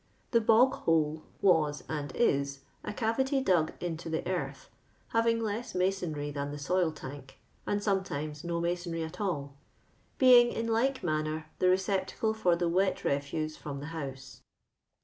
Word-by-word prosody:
The 230 Hz, -, +4 dB
^* 220 Hz, -, -10 dB
l>of;: 250 Hz, +4 st, +5 dB
hnle" 155 Hz, -1 st, +2 dB, 0.2 s
was, 160 Hz, -6 st, +3 dB
and 145 Hz, -3 st, -3 dB
is, 140 Hz, -10 st, +1 dB, 0.2 s
a -, -, -4 dB
cavity 265 Hz, +6 st, 0 dB
dug 180 Hz, -11 st, +2 dB
into 165 Hz, -1 st, -4 dB
the 160 Hz, -, -2 dB
earth, 185 Hz, -, -3 dB, 0.5 s
lia\4ng 230 Hz, 0 st, +3 dB
less 220 Hz, +2 st, -3 dB
masonry 175 Hz, -6 st, -1 dB
tlian 140 Hz, 0 st, -3 dB
the 145 Hz, +4 st, -4 dB
Roil 180 Hz, -3 st, +3 dB
Uuik, 140 Hz, -2 st, -9 dB, 0.3 s
and 205 Hz, 0 st, 0 dB
soinetimos 155 Hz, -8 st, -2 dB
no 170 Hz, -1 st, -2 dB
masonry 170 Hz, -1 st, -2 dB
at 160 Hz, +6 st, -7 dB
all. 145 Hz, -8 st, -2 dB, 0.6 s
being 245 Hz, -2 st, +7 dB
in 230 Hz, -, -2 dB
like 255 Hz, +4 st, +1 dB
mimnor 155 Hz, -1 st, -1 dB
the 185 Hz, -, +3 dB
recoi)tacle 190 Hz, +3 st, +1 dB
for 180 Hz, -6 st, +3 dB
the 170 Hz, 0 st, 0 dB
wet 185 Hz, +3 st, +1 dB
refuse 155 Hz, +2 st, -1 dB
from 140 Hz, -2 st, -6 dB
tho 145 Hz, -, -6 dB
house. 135 Hz, -5 st, -7 dB
170 Hz, 155 wpm, -30 LUFS, 150-210 Hz, 0.6 s, being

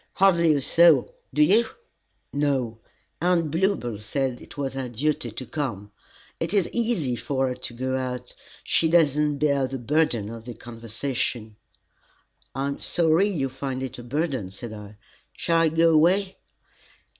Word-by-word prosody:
"Hardly 170 Hz, -5 st, +4 dB
a 140 Hz, -, 0 dB
soul! 165 Hz, -5 st, +5 dB, 0.2 s
Do 150 Hz, +3 st, +4 dB
you?" 205 Hz, +9 st, +5 dB, 0.7 s
"No. 135 Hz, -6 st, 0 dB, 0.4 s
Aunt 170 Hz, -3 st, +2 dB
Bluebell 165 Hz, -, 0 dB
said 130 Hz, +3 st, -2 dB
it -, -, -13 dB
was 135 Hz, -2 st, -3 dB
our 130 Hz, -2 st, -3 dB
duty 130 Hz, +1 st, -1 dB
to 120 Hz, +4 st, -7 dB
come. 115 Hz, -10 st, -4 dB, 0.5 s
It -, -, -2 dB
is 195 Hz, -4 st, +3 dB
easy 220 Hz, -, 0 dB
for 130 Hz, +2 st, -1 dB
her -, -, -2 dB
to -, -, -4 dB
go 130 Hz, +2 st, -2 dB
out; 125 Hz, -1 st, -4 dB, 0.3 s
she 165 Hz, -, +2 dB
does 160 Hz, -4 st, +4 dB
not 150 Hz, -1 st, +1 dB
bear 140 Hz, -2 st, +2 dB
the 135 Hz, -, -4 dB
burden 125 Hz, -4 st, +1 dB
of 115 Hz, 0 st, -9 dB
the 120 Hz, -2 st, -7 dB
conversation." 115 Hz, -1 st, -3 dB, 1.0 s
"I 135 Hz, +1 st, -1 dB
am 140 Hz, -, -5 dB
sorry 170 Hz, +3 st, +2 dB
you 150 Hz, -9 st, -1 dB
find 130 Hz, 0 st, -4 dB
it 130 Hz, -1 st, -6 dB
a -, -, -8 dB
burden," 135 Hz, -, -2 dB
said 110 Hz, +4 st, -8 dB
I. 105 Hz, 0 st, -10 dB, 0.4 s
"Shall 165 Hz, -1 st, +1 dB
I 165 Hz, -1 st, +4 dB
go 165 Hz, +1 st, +4 dB
away?" 185 Hz, +5 st, +3 dB
135 Hz, 160 wpm, -25 LUFS, 120-160 Hz, 1.0 s, soul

